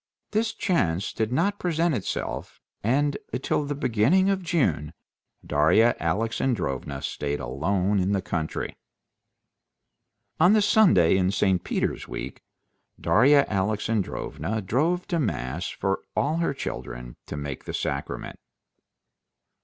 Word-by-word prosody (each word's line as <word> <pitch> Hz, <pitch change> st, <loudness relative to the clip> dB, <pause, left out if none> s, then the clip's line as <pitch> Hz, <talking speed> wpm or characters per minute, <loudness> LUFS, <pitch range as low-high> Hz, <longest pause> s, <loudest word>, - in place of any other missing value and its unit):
This 220 Hz, +1 st, +1 dB
chance 95 Hz, -, 0 dB
did 110 Hz, +1 st, -1 dB
not 195 Hz, +9 st, +1 dB
present 170 Hz, -1 st, +1 dB
itself, 110 Hz, -8 st, -4 dB, 0.2 s
and 140 Hz, +6 st, +1 dB, 0.2 s
till 150 Hz, -, 0 dB
the 145 Hz, 0 st, -3 dB
beginning 140 Hz, -, +3 dB
of 195 Hz, -1 st, 0 dB
June 90 Hz, -, 0 dB, 0.5 s
Darya 80 Hz, +11 st, +4 dB
Alexandrovna 85 Hz, -, -1 dB
stayed 75 Hz, 0 st, -2 dB
alone 95 Hz, +10 st, 0 dB
in 95 Hz, +2 st, +1 dB
the 100 Hz, -2 st, +1 dB
country. 80 Hz, -4 st, -3 dB, 1.6 s
On 180 Hz, +5 st, +6 dB
the 215 Hz, -, +5 dB
Sunday 190 Hz, -, +5 dB
in 95 Hz, -1 st, +2 dB
St. 95 Hz, -2 st, +1 dB
Peter's -, -, -2 dB
week -, -, -6 dB, 0.6 s
Darya 140 Hz, +5 st, +5 dB
Alexandrovna 100 Hz, -3 st, -1 dB
drove 160 Hz, -, 0 dB
to 170 Hz, -3 st, +1 dB
mass 80 Hz, -, -2 dB
for 95 Hz, 0 st, -2 dB
all 155 Hz, +3 st, +1 dB
her 165 Hz, -5 st, 0 dB
children -, -, -6 dB
to 75 Hz, -, -5 dB
take 70 Hz, -2 st, -6 dB
the -, -, -5 dB
sacrament. 70 Hz, 0 st, -4 dB
105 Hz, 120 wpm, -26 LUFS, -, 1.6 s, On